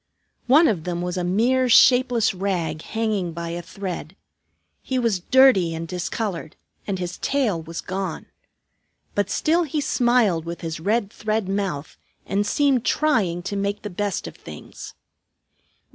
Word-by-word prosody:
One 300 Hz, +6 st, +6 dB
of 180 Hz, -8 st, 0 dB
them 175 Hz, 0 st, -3 dB
was 180 Hz, 0 st, -3 dB
a 180 Hz, -, -2 dB
mere 245 Hz, +8 st, +2 dB
shapeless 245 Hz, -3 st, +5 dB
rag 175 Hz, -5 st, -2 dB
hanging 215 Hz, -6 st, -2 dB
by 170 Hz, 0 st, -5 dB
a 170 Hz, +1 st, -4 dB
thread. 180 Hz, -1 st, -6 dB, 0.7 s
He 260 Hz, -, -2 dB
was 230 Hz, -6 st, +1 dB
dirty 195 Hz, -6 st, +4 dB
and 165 Hz, +1 st, -5 dB
discolored, 180 Hz, -1 st, -4 dB, 0.3 s
and 195 Hz, -2 st, -1 dB
his 180 Hz, -1 st, -5 dB
tail 240 Hz, -12 st, 0 dB
was 165 Hz, +1 st, -6 dB
gone. 185 Hz, -3 st, -4 dB, 0.9 s
But 205 Hz, -1 st, 0 dB
still 330 Hz, +3 st, +2 dB
he 310 Hz, -2 st, -2 dB
smiled 240 Hz, -, +2 dB
with 170 Hz, +1 st, -6 dB
his 165 Hz, -1 st, -4 dB
red 205 Hz, +4 st, 0 dB
thread 215 Hz, -2 st, -2 dB
mouth 190 Hz, -7 st, -3 dB, 0.3 s
and 205 Hz, +1 st, 0 dB
seemed 275 Hz, -3 st, +2 dB
trying 200 Hz, -, +1 dB
to 200 Hz, +2 st, -4 dB
make 200 Hz, +1 st, -2 dB
the 210 Hz, -, -5 dB
best 200 Hz, 0 st, -2 dB
of -, -, -8 dB
things. -, -, -10 dB
195 Hz, 150 wpm, -23 LUFS, 175-235 Hz, 0.9 s, One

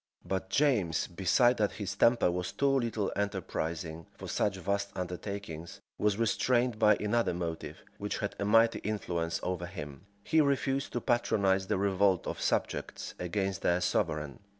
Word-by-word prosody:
But 95 Hz, 0 st, -2 dB
James, 110 Hz, -, +2 dB
besides 95 Hz, +8 st, +3 dB
that 105 Hz, -1 st, +1 dB
his 100 Hz, -2 st, -4 dB
temper 115 Hz, -3 st, +4 dB
was 90 Hz, 0 st, -3 dB
too 140 Hz, 0 st, +1 dB
little 115 Hz, -6 st, 0 dB
enterprising 85 Hz, -5 st, -3 dB
for -, -, -8 dB
such 100 Hz, -2 st, 0 dB
vast 100 Hz, +2 st, -1 dB
undertakings, 90 Hz, -2 st, -5 dB, 0.2 s
was 105 Hz, -1 st, +2 dB
restrained 120 Hz, +1 st, +1 dB
by 105 Hz, 0 st, +6 dB
another 105 Hz, -3 st, +1 dB
motive, 85 Hz, -2 st, -5 dB, 0.2 s
which -, -, -2 dB
had -, -, -3 dB
a 100 Hz, -, 0 dB
mighty 115 Hz, +2 st, +4 dB
influence 85 Hz, -6 st, -2 dB
over 90 Hz, -1 st, -2 dB
him: 75 Hz, -2 st, -8 dB, 0.2 s
he 160 Hz, -, +3 dB
refused 140 Hz, -1 st, 0 dB
to 120 Hz, -, -1 dB
patronize 100 Hz, -6 st, +2 dB
the 105 Hz, -, +1 dB
revolt 95 Hz, -1 st, +2 dB
of -, -, -4 dB
subjects -, -, -2 dB
against 95 Hz, +2 st, -2 dB
their 85 Hz, +1 st, +2 dB
sovereign. 75 Hz, -5 st, -1 dB
100 Hz, 150 wpm, -31 LUFS, 90-115 Hz, 0.2 s, by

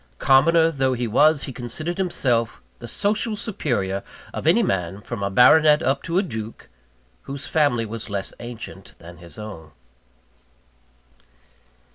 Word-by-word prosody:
Commoner 160 Hz, -, +4 dB
though 135 Hz, -3 st, 0 dB
he 125 Hz, -1 st, -2 dB
was, 150 Hz, +6 st, +3 dB
he 135 Hz, -, -6 dB
considered 155 Hz, +10 st, -5 dB
himself 125 Hz, -, 0 dB, 0.2 s
the 120 Hz, -, -8 dB
social 215 Hz, -, -1 dB
superior 120 Hz, -, -2 dB, 0.3 s
of -, -, -4 dB
any -, -, +5 dB
man, 95 Hz, +1 st, -2 dB
from 110 Hz, +1 st, -7 dB
a 100 Hz, -, -1 dB
baronet 150 Hz, +8 st, +6 dB
up 135 Hz, +1 st, +1 dB
to 170 Hz, +1 st, -2 dB
a 195 Hz, -, +3 dB
duke, 110 Hz, -, -7 dB, 0.6 s
whose 140 Hz, 0 st, -5 dB
family 145 Hz, -7 st, +1 dB
was 110 Hz, +1 st, -7 dB
less 100 Hz, -1 st, -4 dB
ancient 115 Hz, -5 st, -9 dB
than 85 Hz, +1 st, -13 dB
his 85 Hz, -1 st, -13 dB
own. 100 Hz, -8 st, -9 dB
125 Hz, 140 wpm, -23 LUFS, 105-155 Hz, 0.6 s, baronet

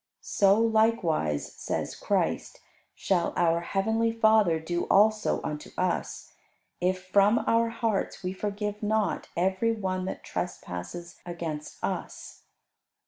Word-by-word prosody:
So 200 Hz, 0 st, +3 dB
likewise, 220 Hz, -, +1 dB
says -, -, -3 dB
Christ, -, -, -1 dB, 0.4 s
shall 180 Hz, -3 st, 0 dB
our 170 Hz, -1 st, +3 dB
Heavenly 220 Hz, +6 st, 0 dB
Father 220 Hz, -7 st, +4 dB
do 175 Hz, +2 st, -2 dB
also 215 Hz, +1 st, +3 dB
unto 150 Hz, 0 st, -5 dB
us 180 Hz, -1 st, -2 dB, 0.5 s
if 185 Hz, +1 st, 0 dB
from 200 Hz, +4 st, +4 dB
our 230 Hz, 0 st, +3 dB
hearts 225 Hz, -5 st, -2 dB
we 180 Hz, +1 st, -2 dB
forgive 210 Hz, +1 st, -3 dB
not 215 Hz, -1 st, 0 dB
every 190 Hz, +6 st, +1 dB
one 185 Hz, -4 st, -2 dB
that 190 Hz, -, -5 dB
trespasses 130 Hz, -, -6 dB
against 165 Hz, -4 st, -5 dB
us. -, -, -5 dB
195 Hz, 115 wpm, -28 LUFS, 175-220 Hz, 0.5 s, Father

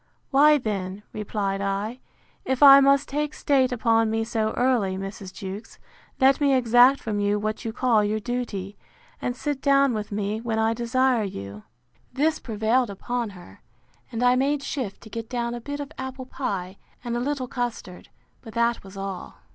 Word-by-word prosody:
—Why 295 Hz, +2 st, +6 dB
then, 200 Hz, -5 st, -4 dB
replied 200 Hz, -2 st, -2 dB
I, 200 Hz, +5 st, -2 dB, 0.4 s
if 265 Hz, +1 st, 0 dB
I 275 Hz, -1 st, +11 dB
must 275 Hz, +1 st, +4 dB
take 295 Hz, +1 st, -2 dB
state 265 Hz, -3 st, +2 dB
upon 225 Hz, -2 st, +2 dB
me 225 Hz, 0 st, 0 dB
so 220 Hz, -1 st, -1 dB
early, 235 Hz, -7 st, +1 dB
Mrs. 195 Hz, 0 st, -7 dB
Jewkes, 195 Hz, +4 st, -8 dB, 0.4 s
let 270 Hz, +1 st, +4 dB
me 280 Hz, -2 st, +4 dB
exact 245 Hz, +2 st, +5 dB
from 210 Hz, -2 st, -3 dB
you 205 Hz, 0 st, +1 dB
what 215 Hz, +1 st, -3 dB
you 225 Hz, -, -3 dB
call 225 Hz, -2 st, +2 dB
your 210 Hz, +1 st, 0 dB
duty; 215 Hz, -5 st, -4 dB, 0.4 s
and 245 Hz, -, -2 dB
sit 285 Hz, +1 st, -3 dB
down 275 Hz, -2 st, +4 dB
with 215 Hz, -1 st, -4 dB
me 210 Hz, +1 st, -2 dB
when 230 Hz, -1 st, -2 dB
I 220 Hz, 0 st, +2 dB
desire 245 Hz, +1 st, +1 dB
you. 100 Hz, -, -7 dB, 0.5 s
This 305 Hz, +5 st, +1 dB
prevailed 225 Hz, +2 st, 0 dB
upon 235 Hz, +4 st, -3 dB
her; 95 Hz, -, -15 dB, 0.5 s
and 230 Hz, +1 st, -2 dB
I 250 Hz, 0 st, +5 dB
made 280 Hz, +2 st, +1 dB
shift 250 Hz, -9 st, -4 dB
to 220 Hz, -, -12 dB
get 230 Hz, -1 st, -6 dB
down 235 Hz, -1 st, -2 dB
a 240 Hz, -, -6 dB
bit 285 Hz, +4 st, -5 dB
of 285 Hz, 0 st, -6 dB
apple 260 Hz, 0 st, -6 dB
pye, 195 Hz, -8 st, -4 dB, 0.2 s
and 240 Hz, -1 st, -3 dB
a -, -, 0 dB
little 265 Hz, 0 st, -2 dB
custard; 240 Hz, -8 st, -5 dB, 0.3 s
but 225 Hz, -2 st, -12 dB
that 235 Hz, 0 st, +1 dB
was 195 Hz, 0 st, -12 dB
all. 195 Hz, -1 st, -6 dB
235 Hz, 180 wpm, -25 LUFS, 205-260 Hz, 0.5 s, I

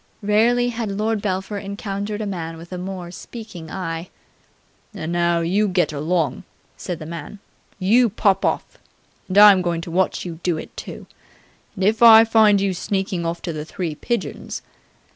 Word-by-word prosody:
Rarely 235 Hz, +4 st, +3 dB
had 230 Hz, -2 st, -3 dB
Lord 215 Hz, +2 st, -1 dB
Belpher 195 Hz, 0 st, -2 dB
encountered 200 Hz, +1 st, -4 dB
a -, -, -2 dB
man 165 Hz, -5 st, -5 dB
with 170 Hz, +2 st, -12 dB
a 180 Hz, -, -5 dB
more 180 Hz, -1 st, -6 dB
speaking 185 Hz, -5 st, -9 dB
eye. 165 Hz, -1 st, -5 dB, 0.9 s
"And 160 Hz, +1 st, -4 dB
now 170 Hz, -1 st, +1 dB
you 195 Hz, +6 st, +1 dB
get 180 Hz, -4 st, +1 dB
along," 155 Hz, 0 st, -1 dB, 0.3 s
said 180 Hz, -, -5 dB
the 155 Hz, -, -9 dB
man. 170 Hz, +4 st, -7 dB, 0.4 s
"You 225 Hz, +6 st, +4 dB
pop 195 Hz, -1 st, +1 dB
off. -, -, -2 dB, 0.5 s
And 185 Hz, -, -2 dB
I'm 205 Hz, -2 st, +9 dB
going 170 Hz, -2 st, -1 dB
to 165 Hz, -, -7 dB
watch 185 Hz, +2 st, 0 dB
you 165 Hz, -2 st, -7 dB
do 175 Hz, -3 st, 0 dB
it, -, -, -9 dB
too. -, -, -8 dB, 0.7 s
And, 190 Hz, -, -3 dB
if 215 Hz, +3 st, +2 dB
I 225 Hz, -1 st, +10 dB
find 220 Hz, -2 st, +4 dB
you 195 Hz, -1 st, 0 dB
sneakin' 190 Hz, -1 st, -2 dB
off 170 Hz, +1 st, -4 dB
to 170 Hz, -, -3 dB
the 150 Hz, -1 st, -4 dB
Three 165 Hz, 0 st, -4 dB
Pigeons 235 Hz, +10 st, -4 dB
190 Hz, 170 wpm, -21 LUFS, 170-210 Hz, 0.9 s, I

